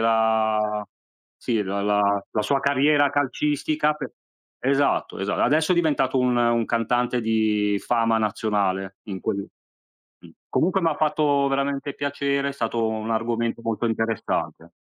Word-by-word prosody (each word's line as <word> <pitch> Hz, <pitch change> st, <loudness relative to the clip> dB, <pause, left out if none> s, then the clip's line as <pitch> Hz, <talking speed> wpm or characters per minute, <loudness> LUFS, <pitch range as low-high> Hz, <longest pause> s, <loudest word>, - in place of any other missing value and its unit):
la 110 Hz, -2 st, +1 dB, 0.5 s
sì, 115 Hz, -3 st, -1 dB
la 100 Hz, +1 st, -3 dB
la 105 Hz, 0 st, +2 dB, 0.3 s
la 105 Hz, -, -1 dB
sua 140 Hz, +4 st, +1 dB
carriera 145 Hz, +1 st, +3 dB
calcistica 150 Hz, +2 st, 0 dB
pe 150 Hz, -, -7 dB, 0.5 s
esatto, 140 Hz, +2 st, +1 dB
esa 100 Hz, +1 st, -1 dB
adesso 155 Hz, +4 st, +2 dB
è -, -, +3 dB
diventato 145 Hz, -6 st, +1 dB
un 125 Hz, -1 st, +2 dB
un 120 Hz, -1 st, +2 dB
cantante 120 Hz, +1 st, 0 dB
di 110 Hz, -2 st, +1 dB
fama 115 Hz, -2 st, +2 dB
nazionale, 100 Hz, -3 st, -1 dB
in 95 Hz, -3 st, -6 dB
quel 100 Hz, 0 st, -2 dB, 0.7 s
mh. -, -, -16 dB, 0.2 s
Comunque 185 Hz, +3 st, +1 dB
m'ha 165 Hz, -3 st, +1 dB
fatto 150 Hz, -2 st, +2 dB
veramente 140 Hz, 0 st, -2 dB
piacere, 140 Hz, 0 st, -1 dB
è -, -, -4 dB
stato 115 Hz, -3 st, -1 dB
un 110 Hz, 0 st, -3 dB
argomento 115 Hz, +1 st, -1 dB
molto 115 Hz, +1 st, -1 dB
interessante. 115 Hz, 0 st, -2 dB
115 Hz, 135 wpm, -24 LUFS, 110-140 Hz, 0.7 s, carriera